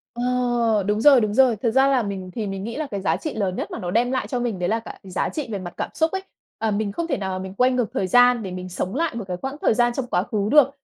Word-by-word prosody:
Ờ, 240 -3 +1
đúng 210 +1 +1
rồi, 270 -2 +7
đúng 210 -1 0
rồi. 255 0 +5
Thật 220 +2 -1
ra 265 +2 +4
là 265 -3 +2
mình 190 -3 -5
thì 215 -3 -3
mình 195 0 -4
nghĩ 230 +2 -5
là 310 -2 -2
cái 200 -2 -3
giá 165 -3 +1
trị 305 - -5
lớn 195 -4 -1
nhất - - -4
mà - - -5
nó 175 -1 -4
đem 240 +5 +2
lại 260 - -1
cho 250 - -2
mình 230 -6 -2
đấy 175 - 0
là 225 - +1
cả 225 - -10
giá 185 -1 -2
trị 300 -6 -4
về 200 - -3
mặt 175 -1 -7
cảm - - -3
xúc 320 +1 +1
ấy. 380 0 -2 0.4
Ờ, 220 -1 -1
mình 205 0 -1
không 335 +10 -3
thể 275 -5 0
nào 190 -2 -3
mình 190 0 -6
quay 250 +5 +3
ngược 245 -4 0
thời 190 - -1
gian 245 +3 +5
để 190 - -5
mình 185 0 -6
sống 185 +3 -4
lại 315 -3 -1
một 230 - -4
cái 180 -1 -3
quãng 270 +7 -5
thời - - +3
gian 240 +1 +2
trong 250 0 -3
quá 180 - +1
khứ 210 -1 -2
được. 290 -3 +6
225 Hz, 315 wpm, -23 LUFS, 195-250 Hz, 0.4 s, rồi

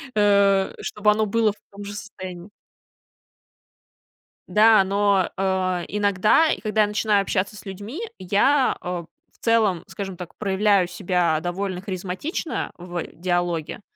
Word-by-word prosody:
э, 200 -2 +3
чтобы 210 0 +1
оно 215 +1 +1
было 220 0 +2
в 210 - -14
том 200 +1 -9
же 205 0 -7
состоянии. 185 -3 -8 2.0
Да, 215 -1 +6
но, 200 -1 +2
а, 185 -2 0
иногда 205 - +3
и - - -2
когда 215 0 +1
я 210 - +4
начинаю 210 -1 +2
общаться 195 +1 -1
с 205 - -12
людьми, 205 - -7 0.2
я, 255 +9 +2
а, 180 -1 -3
в - - -28
целом, 220 -7 +2
скажем 195 -3 -6
так, 180 -2 -9
проявляю 200 -2 +2
себя 175 -4 0
довольно 180 +1 -3
харизматично 190 - -4
в 175 -1 -5
диалоге, 175 0 -2
200 Hz, 135 wpm, -23 LUFS, 180-210 Hz, 2.0 s, Да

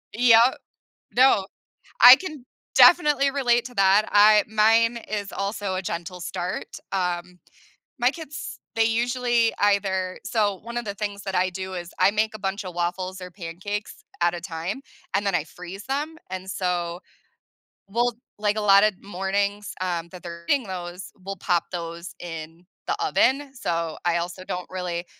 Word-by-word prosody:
Yeah, 235 +1 +6 0.6
no, 245 -6 +5 0.6
I 250 +1 +12
can 305 -8 -8 0.3
definitely 295 -5 +6
relate 245 -4 +2
to 245 - -11
that. 195 +2 +4
I 210 0 +7
mine 225 +2 +3
is 205 -2 -3
also 200 -1 -3
a 185 - -2
gentle 175 +1 -5
start, 180 +1 -4 0.2
um, 180 -1 -2 0.6
my 245 +2 +3
kids, 305 -3 -8 0.2
they 225 - +4
usually 235 0 +1
either 195 -2 +1
so, 205 -4 0
1 235 +1 -8
of 240 - -2
the 200 - -3
things 205 0 -4
that 195 - -4
I 185 +1 +2
do 190 +1 -6
is 175 -1 -6
I 185 +2 +5
make 215 +1 0
a - - -8
bunch 195 +1 -3
of 180 -1 -7
waffles 185 +2 -3
or 180 0 -8
pancakes 190 +4 -6 0.2
at 175 0 +3
a 175 - -5
time 175 +6 -5 0.3
and 200 +1 +1
then 195 - +1
I 155 - 0
freeze 180 +5 -10
them 295 +4 -2
and, 185 0 -6
so 175 -2 -2 0.9
we'll 240 +3 +1 0.3
like, 210 0 +1
a 215 - 0
lotta 200 +1 +6
mornings, 200 +1 -2
um, 170 -2 -2
that 180 - -11
they're 170 -1 -8
eating 280 -4 +3
those, 180 0 -6
we'll 195 +1 -5
pop 175 -1 +1
those 170 0 -6
in 165 0 -8 0.2
the - - +1
oven. 275 +1 +2
So, 165 - -2
I 170 0 +2
also 175 +2 -4
don't 180 -1 -4
really 180 -2 -3
195 Hz, 165 wpm, -24 LUFS, 180-225 Hz, 0.9 s, I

